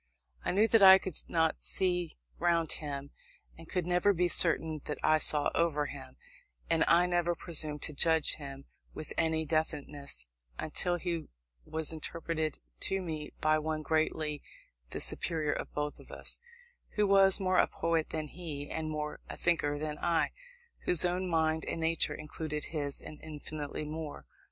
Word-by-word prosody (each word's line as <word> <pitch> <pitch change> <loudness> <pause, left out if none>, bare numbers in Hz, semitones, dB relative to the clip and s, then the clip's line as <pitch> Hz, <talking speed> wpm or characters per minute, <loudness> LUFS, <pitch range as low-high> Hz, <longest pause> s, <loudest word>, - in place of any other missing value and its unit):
I - - -1
knew 210 +4 +4
that 225 - +5
I 190 -1 +10
could 190 -1 -6 0.2
not 160 -1 +1
see 180 -3 -1 0.2
round 170 -2 +2
him, 140 -2 -5 0.4
and 165 0 -14
could 180 -3 -1
never 180 +3 +3
be 180 0 +2
certain 160 -3 +4
that 150 - -3
I 155 0 +4
saw 150 -1 +3
over 155 -3 +1
him; 135 -2 -9 0.5
and 165 -1 +4
I 175 +1 +5
never 175 -1 +1
presumed 155 -4 0
to 150 - -1
judge 160 +2 +3
him 140 -2 -9 0.3
with 155 - -6
any 160 0 +1
definiteness, 145 - -2 0.3
until 175 +3 -1
he 170 -2 -3 0.4
was 160 0 0
interpreted 160 -1 -3 0.2
to 195 - +2
me 155 -4 -5
by 155 0 +3
one 155 0 -3
greatly 155 -1 0 0.5
the - - -5
superior 155 -4 -1
of - - -4
us 150 0 -2
both - - -4 0.6
who 210 - +3
was 195 0 +5
more 185 -1 +2
a - - +5
poet 165 -1 -1
than 155 -1 -3
he, 150 -4 -6
and 160 -1 -3
more 150 -1 -4
a - - -6
thinker 150 -4 +1
than 150 0 -4
I 170 -1 +1 0.5
whose 180 -1 +8
own 180 +1 0
mind 160 -1 +1
and - - -3
nature 165 0 +1
included 150 0 -5
his, 145 -3 -2
and 155 - -11
infinitely 155 -1 -5
more. 150 - -6
160 Hz, 160 wpm, -31 LUFS, 150-170 Hz, 0.6 s, I